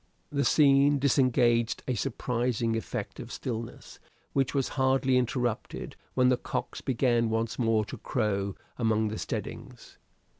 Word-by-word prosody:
The 140 Hz, -1 st, +1 dB
scene 140 Hz, -1 st, +5 dB
disengaged 120 Hz, -4 st, +2 dB
a 130 Hz, -, +1 dB
surprising 120 Hz, 0 st, -1 dB
effect 115 Hz, -, -4 dB
of -, -, -8 dB
stillness, 115 Hz, -2 st, -6 dB, 0.3 s
which 135 Hz, 0 st, +1 dB
was 135 Hz, -2 st, +1 dB
hardly 130 Hz, -1 st, +2 dB
interrupted 125 Hz, -2 st, -1 dB, 0.2 s
when 125 Hz, -1 st, +4 dB
the 125 Hz, -, +3 dB
cocks -, -, -4 dB
began 120 Hz, -2 st, +1 dB
once 115 Hz, +2 st, -1 dB
more 115 Hz, -3 st, +2 dB
to -, -, -8 dB
crow 100 Hz, -2 st, -1 dB, 0.2 s
among 110 Hz, -2 st, +2 dB
the 110 Hz, -, -5 dB
steadings. -, -, -6 dB
120 Hz, 135 wpm, -28 LUFS, 115-130 Hz, 0.3 s, scene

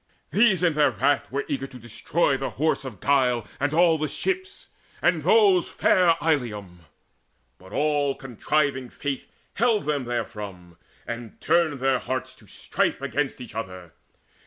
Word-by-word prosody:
These 195 Hz, 0 st, +4 dB
in 170 Hz, -3 st, +3 dB
their 150 Hz, 0 st, +4 dB
wrath 145 Hz, -4 st, 0 dB
were 140 Hz, +2 st, -2 dB
eager 135 Hz, -1 st, -3 dB
to 130 Hz, -, -12 dB
destroy 125 Hz, +6 st, 0 dB
The 135 Hz, 0 st, -3 dB
Horse 155 Hz, -1 st, +1 dB
of 120 Hz, -7 st, -8 dB
Guile 125 Hz, -5 st, +2 dB
and 145 Hz, +1 st, 0 dB
all 165 Hz, 0 st, +4 dB
the 155 Hz, -, 0 dB
ships, 375 Hz, -, -3 dB, 0.3 s
and -, -, +2 dB
those 415 Hz, -6 st, +4 dB
Fair 180 Hz, -4 st, +3 dB
Ilium. 105 Hz, -, -2 dB, 0.7 s
But 95 Hz, +1 st, -15 dB
all 145 Hz, -2 st, +1 dB
contriving 135 Hz, +1 st, -1 dB
Fate 140 Hz, +1 st, -5 dB, 0.2 s
Held 225 Hz, -2 st, +2 dB
them 145 Hz, -4 st, -1 dB
therefrom, 105 Hz, -7 st, -5 dB, 0.3 s
and 120 Hz, -1 st, -7 dB
turned 160 Hz, -4 st, +1 dB
their 135 Hz, -1 st, +2 dB
hearts 130 Hz, 0 st, -4 dB
to 105 Hz, -, -19 dB
strife -, -, -1 dB
Against 140 Hz, +2 st, -2 dB
each 125 Hz, -, -9 dB
other. 95 Hz, -6 st, -7 dB
135 Hz, 150 wpm, -25 LUFS, 120-160 Hz, 0.7 s, These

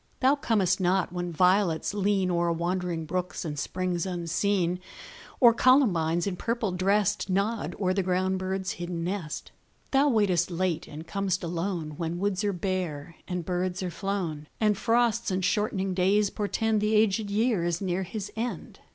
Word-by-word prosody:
Thou 265 Hz, +1 st, +5 dB
comest 205 Hz, -10 st, +1 dB
not 185 Hz, 0 st, +1 dB
when 175 Hz, -1 st, -3 dB
violets 180 Hz, 0 st, +2 dB
lean 200 Hz, -2 st, +1 dB
O'er 170 Hz, 0 st, +1 dB
wandering 170 Hz, -1 st, -2 dB
brooks 180 Hz, +2 st, -3 dB
and 150 Hz, -2 st, -4 dB
springs 185 Hz, +2 st, -2 dB
unseen, 180 Hz, +1 st, 0 dB, 0.6 s
Or 240 Hz, -3 st, +7 dB
columbines, 180 Hz, -, +3 dB
in 190 Hz, -3 st, -2 dB
purple 230 Hz, -2 st, -1 dB
dressed, 195 Hz, +2 st, +1 dB
Nod 200 Hz, +4 st, -1 dB
o'er 185 Hz, -2 st, +1 dB
the 195 Hz, -, +1 dB
ground 185 Hz, +1 st, 0 dB
bird's 190 Hz, 0 st, -2 dB
hidden 175 Hz, -1 st, -4 dB
nest. 175 Hz, -4 st, -4 dB, 0.4 s
Thou 280 Hz, +2 st, +4 dB
waitest 195 Hz, -, +2 dB
late 180 Hz, -1 st, -1 dB
and 155 Hz, +2 st, -9 dB
com'st 195 Hz, -1 st, -1 dB
alone, 165 Hz, -3 st, -3 dB
When 170 Hz, 0 st, -3 dB
woods 200 Hz, +1 st, -1 dB
are 205 Hz, -, +1 dB
bare 175 Hz, -5 st, -3 dB
and 180 Hz, -2 st, -3 dB
birds 180 Hz, +1 st, -2 dB
are 180 Hz, -, -3 dB
flown, 170 Hz, -5 st, -3 dB
And 210 Hz, -2 st, +3 dB
frosts 235 Hz, +1 st, +1 dB
and 185 Hz, -1 st, 0 dB
shortening 195 Hz, -2 st, 0 dB
days 195 Hz, +3 st, +2 dB
portend 215 Hz, +1 st, 0 dB
The 210 Hz, +1 st, +2 dB
aged 210 Hz, -1 st, +2 dB
year 215 Hz, -2 st, +1 dB
is 175 Hz, 0 st, 0 dB
near 185 Hz, -1 st, -1 dB
his 200 Hz, +2 st, -5 dB
end. 235 Hz, +2 st, -4 dB
185 Hz, 160 wpm, -27 LUFS, 175-205 Hz, 0.6 s, Or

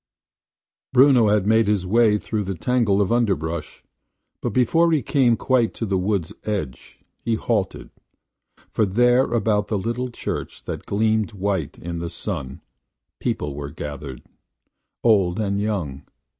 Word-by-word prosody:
Bruno 130 Hz, -3 st, +6 dB
had 105 Hz, -2 st, +2 dB
made 110 Hz, 0 st, +3 dB
his 100 Hz, -3 st, +1 dB
way 110 Hz, +2 st, +4 dB
through 105 Hz, -2 st, -3 dB
a 95 Hz, -, -2 dB
tangle 105 Hz, +1 st, +1 dB
of 100 Hz, -, 0 dB
underbrush; 85 Hz, -9 st, -1 dB, 0.6 s
but -, -, -1 dB
before 165 Hz, +7 st, +3 dB
he 150 Hz, -5 st, +2 dB
came 120 Hz, -2 st, +3 dB
quite 125 Hz, -4 st, +1 dB
to 115 Hz, -, -3 dB
the 100 Hz, -2 st, -1 dB
wood's 95 Hz, -1 st, -1 dB
edge, 95 Hz, -12 st, -4 dB, 0.2 s
he 115 Hz, -, -1 dB
halted: 110 Hz, -3 st, -2 dB, 0.8 s
for 110 Hz, -, +1 dB
there 120 Hz, +6 st, +4 dB
about 110 Hz, -3 st, 0 dB
the 105 Hz, -, -1 dB
little 120 Hz, +5 st, -2 dB
church 120 Hz, -, -5 dB
that -, -, -6 dB
gleamed 110 Hz, +1 st, +1 dB
white 100 Hz, 0 st, -2 dB
in 85 Hz, 0 st, -5 dB
the 85 Hz, 0 st, -4 dB
sun, 65 Hz, -4 st, -5 dB, 0.6 s
people 75 Hz, -1 st, -2 dB
were 70 Hz, 0 st, -6 dB
gathered 70 Hz, -3 st, -7 dB, 0.4 s
– -, -, -55 dB
old 100 Hz, -5 st, +3 dB
and 100 Hz, -1 st, 0 dB
young. 90 Hz, -11 st, -3 dB
105 Hz, 145 wpm, -22 LUFS, 90-115 Hz, 0.8 s, Bruno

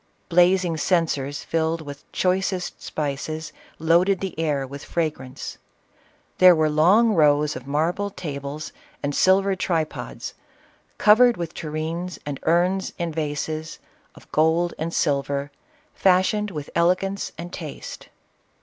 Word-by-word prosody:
Blazing 180 Hz, -1 st, +4 dB
censers, 150 Hz, -5 st, 0 dB
filled 165 Hz, 0 st, 0 dB
with 145 Hz, -1 st, -10 dB
choi 185 Hz, 0 st, +2 dB
cest 190 Hz, -2 st, -3 dB
spices, 155 Hz, +1 st, -4 dB, 0.2 s
loaded 175 Hz, +4 st, +3 dB
the 190 Hz, -3 st, -4 dB
air 145 Hz, -4 st, 0 dB
with 140 Hz, +2 st, -9 dB
fragrance. 145 Hz, -6 st, -4 dB, 0.8 s
There 185 Hz, -1 st, +8 dB
were 155 Hz, -1 st, +2 dB
long 195 Hz, +9 st, +5 dB
rows 150 Hz, -3 st, +3 dB
of 130 Hz, +1 st, -8 dB
marble 165 Hz, +8 st, 0 dB
tables 145 Hz, -4 st, -6 dB, 0.3 s
and 145 Hz, 0 st, -1 dB
silver 195 Hz, +4 st, +3 dB
tripods, 165 Hz, -4 st, -3 dB, 0.6 s
covered 235 Hz, +3 st, +6 dB
with 170 Hz, -1 st, -4 dB
tureens, 160 Hz, +2 st, -4 dB
and 145 Hz, -2 st, -4 dB
urns, 180 Hz, +3 st, +2 dB
and 170 Hz, -2 st, -3 dB
vases, 155 Hz, +1 st, -3 dB, 0.4 s
of -, -, -18 dB
gold 160 Hz, +3 st, +2 dB
and 165 Hz, +2 st, -2 dB
silver, 140 Hz, -2 st, 0 dB, 0.4 s
fashioned 195 Hz, +3 st, +2 dB
with 150 Hz, -6 st, -7 dB
elegance 185 Hz, +3 st, +1 dB
and 175 Hz, +2 st, -7 dB
taste. 155 Hz, -4 st, -8 dB
165 Hz, 120 wpm, -23 LUFS, 150-180 Hz, 0.8 s, There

